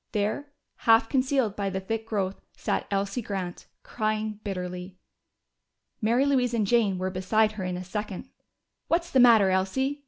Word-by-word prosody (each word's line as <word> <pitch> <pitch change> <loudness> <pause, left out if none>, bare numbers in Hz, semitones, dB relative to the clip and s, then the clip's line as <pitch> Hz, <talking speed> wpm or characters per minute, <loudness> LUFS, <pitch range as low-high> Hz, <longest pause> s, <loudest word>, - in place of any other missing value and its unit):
There, 215 +8 -1 0.4
half 225 0 +6
concealed 260 -5 +1
by 200 -1 -1
the 190 0 -2
thick 225 +3 -4
growth, 195 -3 -2 0.2
sat - - -2
Elsie 200 +4 -1
Grant, 190 -5 -5 0.2
crying 215 -1 -2
bitterly. 180 -1 -5 1.0
Mary 235 +5 +3
Louise 250 -4 +2
and 215 -3 +1
Jane 205 -3 +2
were 185 +1 -2
beside 215 +4 +2
her 215 -3 -6
in 180 -1 -2
a 180 - -5
second. 205 +3 -5 0.6
"What's 340 +1 0
the 265 - +4
matter, 225 -6 +7
Elsie?" 265 +10 0
215 Hz, 155 wpm, -27 LUFS, 190-235 Hz, 1.0 s, matter